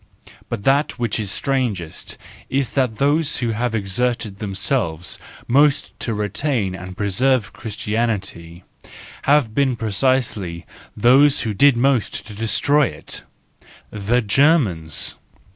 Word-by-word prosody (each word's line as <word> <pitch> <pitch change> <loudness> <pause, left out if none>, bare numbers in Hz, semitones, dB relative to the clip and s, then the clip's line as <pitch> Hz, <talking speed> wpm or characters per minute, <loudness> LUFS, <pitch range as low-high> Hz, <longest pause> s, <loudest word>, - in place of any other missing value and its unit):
But 110 -4 -4
that 140 +5 +2
which 120 -3 -1
is 105 -3 -3
strangest 115 - -2 0.3
is 135 -3 0
that 130 -5 0
those 145 +5 +2
who 120 - -1
have 115 +1 -1
exerted 110 0 -1
themselves 95 - -2 0.3
most 140 +3 +3
to 115 - -2
retain 105 0 -1
and 90 0 -8
preserve 110 +3 +1
Christianity, 105 -6 -3 0.7
have 140 -7 +4
been 135 0 +2
precisely 110 -6 -1 0.3
those 135 +6 +5
who 110 -2 -2
did 140 +4 +5
most 130 -2 +1
to 105 - -10
destroy 130 +7 +2
it,—the 110 +4 -5
Germans. 105 - +2
115 Hz, 110 wpm, -20 LUFS, 100-135 Hz, 0.7 s, those